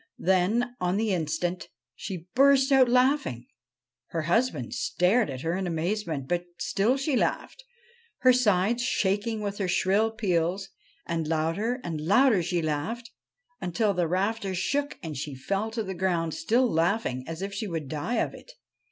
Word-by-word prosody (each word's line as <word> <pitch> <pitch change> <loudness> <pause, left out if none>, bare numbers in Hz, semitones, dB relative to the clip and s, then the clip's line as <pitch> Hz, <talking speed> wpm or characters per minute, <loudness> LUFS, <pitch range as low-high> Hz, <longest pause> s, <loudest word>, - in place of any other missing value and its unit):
Then, 205 +7 +1
on 180 +2 +1
the 215 -2 +1
instant, 175 +2 -2 0.3
she 185 -4 -6
burst 275 +1 +5
out 265 -2 +6
laughing. 255 - +2 0.6
Her 165 -2 -3
husband 230 +10 0
stared 230 - +2
at 130 -2 -5
her 165 +3 -1
in 190 -1 -2
amazement, 165 -4 -2
but 175 +2 -1
still 205 +8 +1
she 275 +1 0
laughed, - - -1 0.6
her 255 -1 +6
sides 225 -1 +2
shaking 215 -2 0
with 205 0 -4
her 195 - 0
shrill 195 +5 +2
peals; 195 -3 -1 0.4
and 165 -2 -2
louder 165 +10 0
and 160 -3 -4
louder 210 - +4
she 170 0 -1
laughed, 185 +11 -3 0.5
until 200 +4 0
the 175 -2 0
rafters 195 +2 -1
shook 285 +10 -1
and 155 -4 -5
she 140 0 -5
fell 195 +11 -2
to 225 0 -3
the 190 -1 -5
ground, 170 -3 0
still 250 +3 +2
laughing 165 - 0
as 165 +3 -5
if 200 0 -4
she 205 +2 -3
would 165 -5 -4
die 155 - -3
of - - 0
it. - - -13
195 Hz, 160 wpm, -27 LUFS, 170-230 Hz, 0.6 s, out